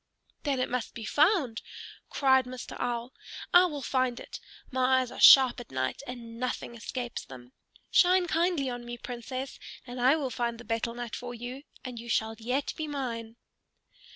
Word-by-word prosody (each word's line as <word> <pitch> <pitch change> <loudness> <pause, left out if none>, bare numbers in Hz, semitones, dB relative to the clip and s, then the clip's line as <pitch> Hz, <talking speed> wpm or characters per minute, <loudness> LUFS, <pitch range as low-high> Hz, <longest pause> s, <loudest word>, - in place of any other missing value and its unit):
"Then 280 -3 0
it 255 - +1
must 250 -2 -3
be 225 - -6
found!" 295 - +2 0.5
cried 265 -2 +4
Mr. 250 0 -7
Owl. 240 +1 -2 0.4
"I 355 +1 +8
will 295 -6 -4
find 255 -1 0
it. - - -8 0.3
My 260 0 +3
eyes 255 -2 -2
are - - -9
sharp 260 -2 +9
at 245 - -9
night 130 0 -2
and 235 -2 -8
nothing 250 -1 -3
escapes 240 +1 -5
them. 125 -1 -12 0.4
Shine 365 0 +5
kindly 335 -3 +1
on 245 -1 -4
me, 240 0 -6
Princess, 255 +3 -6 0.3
and 245 0 -6
I 260 +4 +6
will 280 -5 -2
find 235 -1 -2
the 240 - -11
betel 230 +1 -2
nut 240 -2 -5
for 245 0 -6
you, 245 +3 -7 0.2
and 250 -2 -6
you 235 +1 -9
shall 220 0 +1
yet 250 +5 -1
be 315 - -4
mine." 235 -6 -4
250 Hz, 180 wpm, -29 LUFS, 235-270 Hz, 0.5 s, sharp